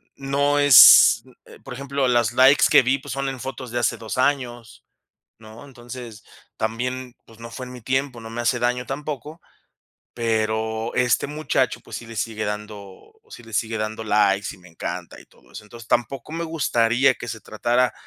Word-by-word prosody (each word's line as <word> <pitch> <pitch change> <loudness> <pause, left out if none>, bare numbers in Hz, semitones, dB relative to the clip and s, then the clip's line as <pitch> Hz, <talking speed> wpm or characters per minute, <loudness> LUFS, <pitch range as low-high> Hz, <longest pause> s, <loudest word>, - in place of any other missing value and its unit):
no 140 +1 0
es 145 -3 +8 0.2
eh, - - -16
por 130 - -9
ejemplo, 140 0 -2
las 120 -2 +2
likes 130 +3 +5
que 140 -3 +7
vi, 130 +2 +1
pues, - - -9
son 135 0 -3
en 135 - -7
fotos 130 -1 -7
de 120 - -1
hace 120 - 0
2 110 +2 -6
años, 125 -4 -2 0.5
¿no? 110 +4 -13
Entonces, 120 -4 -11 0.3
también, 125 +3 -4
pues, 115 -1 -19
no 115 0 -9
fue 130 +2 -7
en 125 - -10
mi 125 - -11
tiempo, 130 0 -2
no 115 - -9
me 120 +1 -5
hace 120 +1 0
daño 125 +1 -1
tampoco. 150 +3 -6 0.7
Pero 110 0 -2
este 125 -1 +1
muchacho, 145 -3 -1
pues, - - -9
sí 120 - -9
le 115 - -10
sigue 110 +1 -3
dando, 105 -2 -8 0.2
sí 120 - -11
le 115 - -15
sigue 110 +2 -1
dando 110 +1 -4
likes 105 -1 +2
y - - -18
me 90 0 -17
encanta 80 - -7
y - - -17
todo - - -25
eso. - - -10
Entonces, 115 +1 -13
tampoco 120 +4 -1
me 165 +1 -3
gustaría 130 -5 +1
que - - -9
se 110 -1 -6
tratara 120 +4 0
120 Hz, 190 wpm, -22 LUFS, 110-135 Hz, 0.7 s, es